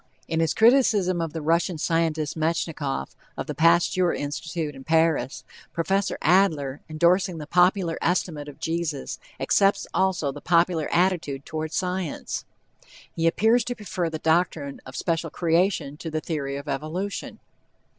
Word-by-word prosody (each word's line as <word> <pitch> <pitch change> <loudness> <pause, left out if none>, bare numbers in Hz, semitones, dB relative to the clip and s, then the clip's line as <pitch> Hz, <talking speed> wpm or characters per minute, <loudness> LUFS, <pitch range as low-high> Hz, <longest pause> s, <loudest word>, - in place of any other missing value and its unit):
In 160 - -1
his 165 -2 +1
criticism 220 -7 +4
of 165 -2 -2
the 160 -1 -5
Russian 170 +2 +1
scientist, 160 -2 0
Metchnikoff, 155 - -2 0.2
of - - -3
the - - -4
Pasteur 170 +2 +3
Institute 155 +2 -4
in 135 -1 -11
Paris, 160 -4 +1 0.3
Prof. 195 +4 0
Adler, 155 -7 +2
endorsing 170 +3 +2
the 150 - -6
popular 180 +1 +2
estimate 160 -4 -1
of 145 - -13
Jesus, 160 -4 -3 0.2
accepts 195 0 +2
also 185 -7 +1
the 145 +1 -10
popular 170 -2 +2
attitude 170 -6 +1
toward 155 0 -4
science. 180 -3 -3 0.7
He 165 0 +1
appears 225 +7 +3
to 245 - -3
prefer 185 -6 -3
the 160 - -4
doctrine 160 -3 0
of 130 - -10
special 165 -1 -1
creation 165 -3 0
to 165 - -6
the 155 0 -2
theory 145 -4 -3
of 140 +1 -8
evolution. 160 +8 -4
165 Hz, 145 wpm, -25 LUFS, 155-180 Hz, 0.7 s, criticism